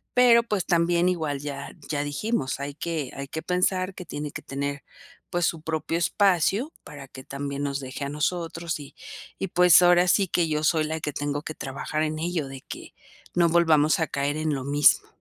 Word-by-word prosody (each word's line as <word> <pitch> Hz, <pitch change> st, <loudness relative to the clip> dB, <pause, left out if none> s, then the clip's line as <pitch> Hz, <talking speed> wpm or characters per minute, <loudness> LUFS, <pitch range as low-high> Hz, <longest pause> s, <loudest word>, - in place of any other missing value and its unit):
pero, 240 Hz, -2 st, +6 dB
pues, 210 Hz, -6 st, -2 dB
también 170 Hz, 0 st, +2 dB
igual 155 Hz, -6 st, -2 dB
ya 140 Hz, -1 st, -6 dB, 0.2 s
ya 145 Hz, -1 st, -1 dB
dijimos: 145 Hz, -, -2 dB
"Hay 140 Hz, +1 st, -4 dB
que 155 Hz, -5 st, -3 dB
hay 140 Hz, 0 st, -6 dB
que 160 Hz, +3 st, -5 dB
pensar 185 Hz, +1 st, 0 dB
que 180 Hz, -, -8 dB
tiene 150 Hz, -2 st, -5 dB
que -, -, -7 dB
tener 140 Hz, +1 st, -4 dB, 0.5 s
pues 175 Hz, -1 st, +1 dB
su 165 Hz, -2 st, -1 dB
propio 160 Hz, +1 st, -2 dB
espacio 200 Hz, -, +2 dB
para 145 Hz, -2 st, -10 dB
que 130 Hz, 0 st, -11 dB
también 140 Hz, +1 st, -5 dB
nos 140 Hz, -1 st, -2 dB
deje 130 Hz, +1 st, -6 dB
a -, -, -4 dB
nosotros". 165 Hz, +2 st, -2 dB
Y 140 Hz, -, -12 dB, 0.4 s
y 195 Hz, -, -3 dB
pues 180 Hz, -1 st, +6 dB
ahora 175 Hz, 0 st, +5 dB
sí 195 Hz, +1 st, +3 dB
que 170 Hz, -2 st, +1 dB
yo 150 Hz, 0 st, -1 dB
soy 155 Hz, 0 st, +3 dB
la 160 Hz, +1 st, -3 dB
que 150 Hz, -1 st, -4 dB
tengo 145 Hz, 0 st, -2 dB
que 155 Hz, -, -5 dB
trabajar 140 Hz, +3 st, -3 dB
en 155 Hz, 0 st, -2 dB
ello, 165 Hz, -3 st, -2 dB
de 135 Hz, -1 st, -9 dB
que -, -, -10 dB, 0.4 s
no 175 Hz, -1 st, +4 dB
volvamos 160 Hz, -2 st, +4 dB
a 160 Hz, -, +1 dB
caer 140 Hz, +1 st, -1 dB
en 155 Hz, -1 st, -1 dB
lo 130 Hz, -1 st, -5 dB
mismo. 145 Hz, +1 st, +4 dB
155 Hz, 200 wpm, -25 LUFS, 145-175 Hz, 0.5 s, pero